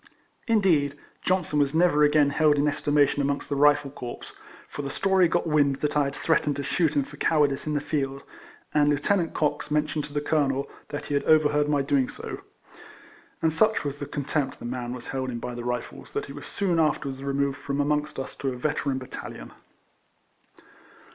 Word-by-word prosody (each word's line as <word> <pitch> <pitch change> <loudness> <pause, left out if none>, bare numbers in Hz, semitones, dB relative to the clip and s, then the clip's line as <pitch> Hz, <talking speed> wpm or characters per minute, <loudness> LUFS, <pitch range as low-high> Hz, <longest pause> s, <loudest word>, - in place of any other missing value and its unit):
Indeed, 170 - +2 0.2
Johnson 180 -5 +1
was 140 +1 +1
never 160 -3 +4
again 145 -1 +4
held 150 0 +4
in 145 +1 +2
estimation 145 -1 +2
amongst 140 0 -1
the 145 - 0
Rifle 145 0 +4
corps; 125 -3 -8 0.4
for - - -6
the 140 - -4
story 190 +4 +3
got 175 +1 0
wind 145 -3 +3
that 150 +2 -2
I 145 -1 +3
had 140 0 -4
threatened 160 -3 +1
to 140 - -3
shoot 155 0 +1
him 140 - +3
for 145 +2 -12
cowardice 145 -2 +1
in 150 - -1
the - - +2
field, 140 -2 -2 0.5
and 145 -1 +4
Lieut. 165 +4 +1
Cox 150 -2 0
mentioned 150 0 0
to 150 - -12
the 145 - +1
Colonel, 140 -2 0 0.2
that 145 - -5
he - - -4
had 140 - +2
overheard 150 -1 +4
my 145 -2 +2
doing 135 -2 +1
so; - - -7 1.0
and 160 -1 +3
such 215 +7 +3
was 145 0 -4
the 145 - -5
contempt 145 0 -2
the - - -10
man 120 0 -4
was 125 - -9
held 130 -1 -2
in 120 - -4
by 125 +1 -5
the 120 0 -6
Rifles, 125 0 -5
that - - -2
he 140 - -9
was 145 0 -9
soon 180 -4 0
afterwards 140 -3 0
removed 140 0 -1
from 140 0 -3
amongst 150 +1 0
us 135 - -5
to 135 - -2
a 130 - -4
veteran 140 0 -1
bat 130 -1 -8
talion. - - -8
145 Hz, 200 wpm, -26 LUFS, 140-150 Hz, 1.0 s, never